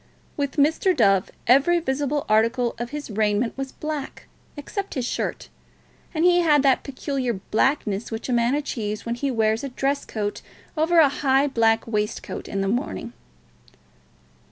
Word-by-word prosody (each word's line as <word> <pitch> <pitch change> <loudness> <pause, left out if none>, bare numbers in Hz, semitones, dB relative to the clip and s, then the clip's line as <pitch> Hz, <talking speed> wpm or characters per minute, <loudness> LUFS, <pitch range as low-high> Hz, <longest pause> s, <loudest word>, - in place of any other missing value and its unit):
With 280 -2 -2
Mr. 320 +5 +2
Dove 195 -5 +3 0.2
every 280 +8 +4
visible 290 -1 -1
article 230 +3 +2
of 240 0 -4
his 295 -4 -6
raiment 215 +2 0
was 270 0 -5
black, 300 -3 -6 0.3
except 395 +7 -5
his 255 -3 -1
shirt, - - -3 0.6
and 325 0 0
he 355 0 +5
had 300 -5 +4
that 270 -2 +4
peculiar 270 -2 -3
blackness 215 +1 0
which 225 0 -5
a 255 - -1
man 235 +3 +2
achieves 215 -8 -3
when 235 - -1
he 275 +4 -2
wears 220 -2 +1
a 275 - -3
dress 275 +2 -1
coat 205 -2 -4 0.3
over 325 +2 +2
a 320 -3 +8
high 275 0 +2
black 225 -5 +2
waistcoat 210 -2 -3
in 195 - -2
the 195 - 0
morning. 195 - -3
260 Hz, 155 wpm, -24 LUFS, 225-290 Hz, 0.6 s, a